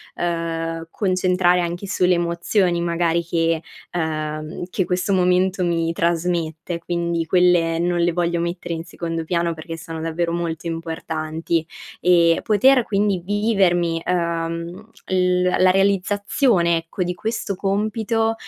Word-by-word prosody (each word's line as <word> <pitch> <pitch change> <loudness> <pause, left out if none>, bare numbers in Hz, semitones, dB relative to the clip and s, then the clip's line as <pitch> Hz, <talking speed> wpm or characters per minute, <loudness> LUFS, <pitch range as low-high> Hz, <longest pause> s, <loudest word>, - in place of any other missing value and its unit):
uhm, 165 -1 -2
concentrare 185 -2 +2
anche 175 +3 -4
sulle 180 -2 +2
emozioni 175 +1 +1
magari 170 0 +1
che, 165 -1 0 0.3
ehm, 155 -1 -3
che 190 - 0
questo 180 +2 -1
momento 185 0 +2
mi 165 -1 0
trasmette 170 0 -1
quindi, 170 -1 -2
quelle 175 -1 +3
non 175 0 0
le 175 +1 +3
voglio 170 0 0
mettere 170 0 -3
in 165 0 -4
secondo 165 -1 -4
piano 170 0 0
perché 165 +1 -7
sono 165 -1 -7
davvero 165 +1 -1
molto 170 -1 -3
importanti; 160 0 -3 0.4
e, 170 -2 +4
poter 245 +4 +4
quindi 200 -3 +1
vivermi, 185 -5 +1
uhm, 170 +3 -2 0.2
l 180 -1 +2
la 180 0 +3
realizzazione 195 - +2
ecco, 165 +3 -3
di 180 0 -2
questo 220 +2 -3
compito, 220 +3 0
175 Hz, 125 wpm, -21 LUFS, 165-185 Hz, 0.4 s, e